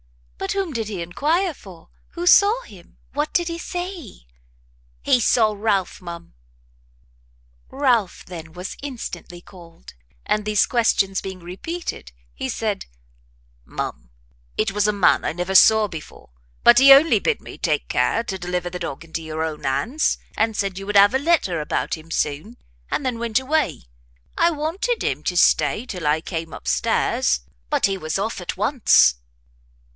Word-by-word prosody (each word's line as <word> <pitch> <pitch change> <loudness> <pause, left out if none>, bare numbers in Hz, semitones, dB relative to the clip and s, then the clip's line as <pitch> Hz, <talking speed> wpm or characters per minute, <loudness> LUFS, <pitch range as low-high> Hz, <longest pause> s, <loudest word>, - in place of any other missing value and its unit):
"But - - -2
whom 385 -6 -2
did 225 -3 -3
he 195 -5 -4
enquire 320 - 0
for? 185 - -15 0.2
who 345 0 -5
saw 415 +7 +5
him? 185 -5 -16 0.2
what 295 +2 -1
did 345 -1 +1
he 335 0 -4
say?" 350 - -6 0.8
"He 250 - +4
saw 220 -2 +3
Ralph, 200 -3 -1
ma'am." 170 -1 -9 1.4
Ralph, 245 -9 0
then, 165 -3 -9
was 180 +2 -7
instantly 250 -9 -7
called; 170 - -15 0.3
and 210 - 0
these 210 -1 +2
questions 200 -5 +1
being 190 -1 -7
repeated, 185 - -6 0.2
he - - -5
said, - - -3 0.8
"Ma'am, - - -6 0.5
it 215 - +1
was 210 +1 +1
a - - +3
man 200 -3 +3
I - - -1
never 180 +3 -3
saw 220 +2 +6
before; 160 - -11 0.3
but - - +8
he 275 +1 +8
only 285 +4 +7
bid 465 - 0
me - - -11
take - - 0
care 230 - +1
to 190 -5 -5
deliver 180 0 -3
the 180 - -5
dog 140 +1 -6
into 165 0 -5
your 160 0 -4
own 155 -2 -5
hands, 240 - 0 0.2
and 220 0 0
said 195 -1 -2
you 195 - -8
would 205 0 +2
have 200 +3 +7
a 265 - +2
letter 280 - +1
about 150 - -2
him 160 0 -14
soon, 165 +9 -2 0.3
and - - -2
then 245 -3 -2
went 235 -1 +1
away; 265 - -1 0.5
I 335 - +4
wanted 340 +10 -2
him 140 +2 -1
to 180 - -1
stay 215 +5 +3
till 180 -10 -5
I 150 +2 +3
came 165 -1 -5
up - - -10
stairs, 65 -2 +1 0.3
but - - +2
he 195 -1 0
was 155 0 -2
off 200 0 -3
at 180 - -5
once." 210 - +4
200 Hz, 165 wpm, -22 LUFS, 170-265 Hz, 1.4 s, but